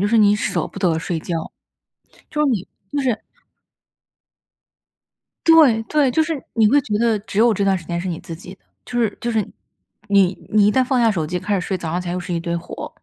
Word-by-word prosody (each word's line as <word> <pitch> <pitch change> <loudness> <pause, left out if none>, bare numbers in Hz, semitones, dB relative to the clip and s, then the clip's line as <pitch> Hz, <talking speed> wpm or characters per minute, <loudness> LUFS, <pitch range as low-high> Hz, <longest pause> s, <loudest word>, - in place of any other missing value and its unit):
就 200 - +1
是 230 - +3
你 210 -2 +5
舍 210 - -1
不 - - -10
得 170 -4 +1
睡 165 0 -3
觉。 170 - -4 1.0
就 300 - -2
是 300 - +3
你 205 -7 -1 0.2
就 290 - -2
是 240 -5 -1 2.2
对 300 -9 +6
对， 290 -1 +2
就 320 +6 +2
是 315 -3 -3
你 220 -2 +4
会 285 +4 +4
觉 210 -6 -2
得 225 -2 +2
只 200 -1 -5
有 230 +1 +5
这 200 0 0
段 195 -1 +3
时 170 - -8
间 170 +1 -3
是 185 - -5
你 170 -2 -4
自 165 - -8
己 180 +3 -11
的， - - -37 0.2
就 245 - -4
是 220 -3 0
就 235 - -2
是 220 -2 +1 0.7
你 195 -3 +4 0.2
你 210 -1 +5
一 - - +4
旦 260 +2 +3
放 255 -1 +1
下 230 -1 +4
手 165 -7 -1
机 180 +3 -2
开 205 +3 -2
始 195 - +1
睡， 190 - -1
早 165 -3 -5
上 175 - -1
起 180 - -8
来 175 - -2
又 180 - -2
是 175 - -5
一 170 - 0
堆 170 +1 -2
活。 170 - -8
205 Hz, 260 characters per minute, -20 LUFS, 180-235 Hz, 2.2 s, 对